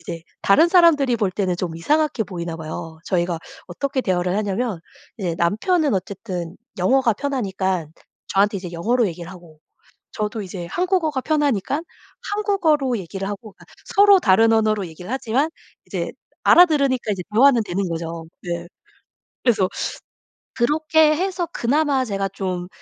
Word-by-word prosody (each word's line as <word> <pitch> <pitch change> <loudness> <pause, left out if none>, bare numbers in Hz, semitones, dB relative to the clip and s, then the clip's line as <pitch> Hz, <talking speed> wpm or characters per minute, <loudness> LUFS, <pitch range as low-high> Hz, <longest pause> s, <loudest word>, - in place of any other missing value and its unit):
이제 170 -1 -7 0.2
다른 315 +13 +5
사람들이 305 -9 +5
볼 205 -4 0
때는 185 -2 -1
좀 170 -3 -4
이상하게 295 - +1
보이나 170 -3 -5
봐요. 160 0 -7
저희가 175 -2 0 0.3
어떻게 265 +9 -2
대화를 180 -3 0
하냐면 205 -2 -1 0.4
이제 175 -4 -2
남편은 275 - +2
어쨌든 185 -3 -4 0.2
영어가 240 +5 +3
편하니깐 190 - -2 0.3
저한테 200 +1 +2
이제 180 -2 -7
영어로 225 +7 +1
얘기를 170 0 -6
하고 170 -4 -14 0.5
저도 215 -1 -3
이제 180 -2 -6
한국어가 340 - 0
편하니깐 290 - 0 0.5
한국어로 315 - +1
얘기를 195 +2 -5
하고 205 +1 -7
그러니까 - - -19 0.3
서로 400 -2 +7
다른 225 +3 +4
언어로 215 -3 +2
얘기를 175 +5 -10
하지만 265 +3 0 0.4
이제 - - -4 0.3
알아들으니까 280 -10 +5
이제 185 - -4
대화는 245 0 +5
되는 185 0 -2
거죠. 165 0 -5 0.2
네. 170 -1 -4 0.8
그래서 210 -7 +3 0.9
그렇게 305 +4 +3
해서 360 0 -1
그나마 280 +2 +1
제가 195 -2 -2
좀 185 -2 -4
210 Hz, 345 characters per minute, -21 LUFS, 180-280 Hz, 0.9 s, 서로